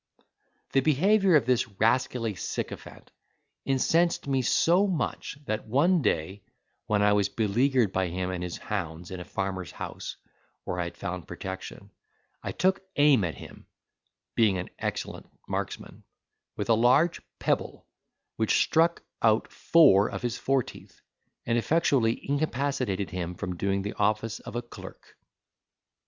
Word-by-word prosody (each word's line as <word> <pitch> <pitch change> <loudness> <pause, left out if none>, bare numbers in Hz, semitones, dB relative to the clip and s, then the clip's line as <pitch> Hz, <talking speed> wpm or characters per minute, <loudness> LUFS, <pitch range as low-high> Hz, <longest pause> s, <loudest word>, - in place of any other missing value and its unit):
The 135 - +4
behaviour 185 +7 +4
of 140 -6 +4
this 125 -1 +2
rascally 115 0 +1
sycophant 90 - -6 0.5
incensed 165 +6 +2
me 135 -2 +1
so 175 +10 +3
much, 160 -6 -3
that 110 -2 -3
one 155 +9 +3
day, 95 - -1 0.5
when 105 -1 +2
I 105 0 +5
was 100 -1 +2
beleaguered 115 +1 +1
by 95 -1 +1
him 90 +2 -3
and 90 -1 -4
his 90 -1 -4
hounds 85 +2 -5
in 95 - -5
a - - -6
farmer's 95 -3 -4
house, - - -6 0.5
where 90 - -4
I 90 - 0
had 85 - -8
found 90 -5 -5
protection, 95 0 -7 0.5
I - - -4
took 190 +1 +1
aim 145 -7 +5
at 85 -3 -2
him - - -12 0.7
(being 105 -5 +3
an 90 - -5
excellent - - -4 0.2
marksman) - - -5 0.5
with - - -3
a - - +7
large 130 +9 +3 0.2
pebble, - - -1 0.5
which 110 -1 +2
struck 165 +1 +2 0.2
out 110 -1 +2
four 105 -12 +5
of - - -6
his 120 -1 -1
foreteeth, 135 -1 -2 0.5
and 120 0 +2
effectually 135 -5 +1
incapacitated 135 - -1
him 90 -1 -4
from 90 +1 -4
doing 100 +2 -1
the 105 - -4
office 110 +2 0
of - - -10
a 120 - -2
clerk. 120 - -12
115 Hz, 145 wpm, -27 LUFS, 95-140 Hz, 0.7 s, a